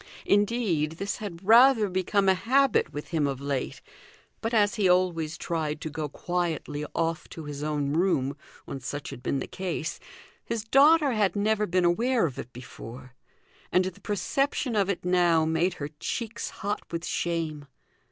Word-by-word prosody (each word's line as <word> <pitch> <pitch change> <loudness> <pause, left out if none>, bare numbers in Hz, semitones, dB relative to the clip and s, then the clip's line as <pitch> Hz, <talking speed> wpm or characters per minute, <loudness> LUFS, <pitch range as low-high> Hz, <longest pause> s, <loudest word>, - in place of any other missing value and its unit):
Indeed, 205 -7 +2
this 195 +5 -3
had 195 -4 -7
rather 235 -1 +7
become 190 +2 +1
a 190 - +6
habit 265 +8 +2
with 145 - -7
him 155 -4 +1
of 135 -2 -3
late; 140 -2 -3 0.6
but 225 - -2
as 210 -2 +3
he 205 -5 +2
always 170 -3 +1
tried 155 -2 -2
to 155 - -4
go 150 0 -4
quietly 160 -3 -3
off 165 -1 -1
to 160 - -8
his 145 -1 -6
own 145 -2 -1
room 150 -6 +1 0.3
when 135 - -6
such 145 +3 -5
had 130 -3 -9
been 135 - -1
the 135 - -3
case, 170 -3 -4 0.4
his 230 -2 -3
daughter 285 +5 +5
had 215 -4 +1
never 210 +1 +1
been 180 0 +2
aware 230 +6 +2
of 140 -6 -4
it 125 - -7
before, 125 +1 -10 0.6
and 185 0 +3
the 190 +2 -6
perception 255 +4 -1
of 200 -2 +2
it 180 -3 -2
now 175 -3 +3
made 165 +3 +1
her 145 -3 -5
cheeks 230 -1 -3
hot 205 +1 -3
with 170 0 -3
shame. 160 -4 -2
175 Hz, 170 wpm, -27 LUFS, 150-210 Hz, 0.6 s, rather